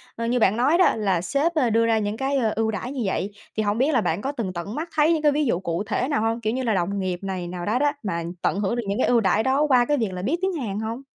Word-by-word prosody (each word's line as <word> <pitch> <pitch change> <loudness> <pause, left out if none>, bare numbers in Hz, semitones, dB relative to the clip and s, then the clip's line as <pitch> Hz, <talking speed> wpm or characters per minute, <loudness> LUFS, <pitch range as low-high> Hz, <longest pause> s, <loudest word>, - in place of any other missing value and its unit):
ờ, 230 - -3
như 245 +2 +1
bạn 215 0 +3
nói 285 +7 +3
đó, 365 - +4
là 195 -5 0
sếp, 280 - 0
ơ, 265 -6 +2
đưa 230 +1 +3
ra 225 -1 +2
những 210 0 -2
cái, 270 +3 0
ơ, 225 -5 +1
ưu 220 0 0
đãi 240 +4 -4
như 275 -3 -4
vậy, 195 +1 -2 0.3
thì 215 - +1
hông 205 +1 0
biết 275 +6 +2
là 245 - +3
bạn 170 -1 -1
có 275 - -2
từng 225 -10 -4
tận 180 +5 -5
mắt 325 +3 -4
thấy 310 +2 +4
những 320 - 0
cái 300 -1 +4
ví 295 +1 +1
dụ 205 -9 +1
cụ 170 0 -2
thể 245 +4 -1
nào 280 -7 0
hông? 225 +1 -1
Kiểu 220 0 -1
như 260 +1 -2
là 230 -3 +1
đồng 195 +2 -1
nghiệp 185 -2 -2
này 185 -2 -4
nào 175 0 -5
đó 220 +4 +1
đó, 290 +1 +3
mà 170 -5 -2 0.2
tận 195 - 0
hưởng 205 +3 0
được 240 - -2
những 200 +1 -1
cái - - +2
ưu 240 - +4
đãi 205 +2 +2
đó 265 +4 +2
qua 250 -4 +4
cái 295 +3 +1
việc 225 -5 0
là 180 - -5
biết 265 - 0
tiếng 380 0 0
Hàn 220 - -3
hông? 225 +3 -4
225 Hz, 330 wpm, -24 LUFS, 200-270 Hz, 0.3 s, đó